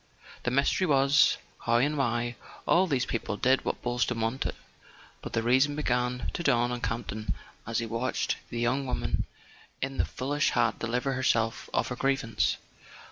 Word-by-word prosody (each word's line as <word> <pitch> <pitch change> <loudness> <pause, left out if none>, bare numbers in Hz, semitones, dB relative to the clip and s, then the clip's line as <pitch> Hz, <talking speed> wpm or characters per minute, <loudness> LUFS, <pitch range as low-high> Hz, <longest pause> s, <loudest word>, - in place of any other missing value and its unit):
The - - +3
mystery 140 +8 +2
was, 140 0 +5 0.2
how 115 - +1
and 140 +6 +3
why 120 -3 0 0.3
all 185 +2 +5
these 135 -5 +1
people 110 -3 -2
did 130 +4 +3
what - - -3
Boylston 120 -1 0
wanted; 115 +4 -1 0.7
but - - -7
the 115 - +1
reason 130 +5 +3
began 125 -3 0
to - - -3
dawn 120 -6 +2
on 120 -1 -3
Campton 110 -1 -3 0.3
as 115 -1 -1
he 115 - 0
watched 115 +3 -1
the 120 - -4
young 130 +3 +1
woman - - -1 0.5
in 135 0 -3
the - - +3
foolish 145 +3 0
hat 115 -2 +1
deliver 125 +4 -1
herself 115 -3 +1
of - - 0
her 125 - -3
grievance. 125 -6 +1
125 Hz, 165 wpm, -29 LUFS, 115-135 Hz, 0.7 s, was